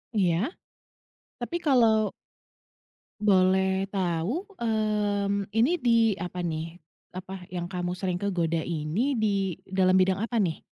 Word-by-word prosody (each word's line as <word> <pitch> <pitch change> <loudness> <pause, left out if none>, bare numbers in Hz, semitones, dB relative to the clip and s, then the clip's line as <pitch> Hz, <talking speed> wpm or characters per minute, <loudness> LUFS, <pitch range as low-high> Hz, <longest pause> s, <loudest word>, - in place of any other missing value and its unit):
Iya. 190 - +1 0.9
Tapi, 250 +8 -3
kalau 230 -8 +3 1.1
boleh 190 -1 +3
tahu, 190 - -1 0.2
mmm, 205 -3 0
ini, 225 +8 +2
di, 230 -3 +4
apa 180 0 -4
nih 165 +1 -4 0.4
apa, 185 -1 -8
yang 175 -1 -4
kamu 180 0 -3
sering 180 -2 -2
kegoda 170 -5 0
ini, 170 - -1
di 200 -4 0
dalam 190 -1 +3
bidang 190 +1 +2
apa 235 +1 -1
nih? 180 -7 0
190 Hz, 115 wpm, -27 LUFS, 180-220 Hz, 1.1 s, di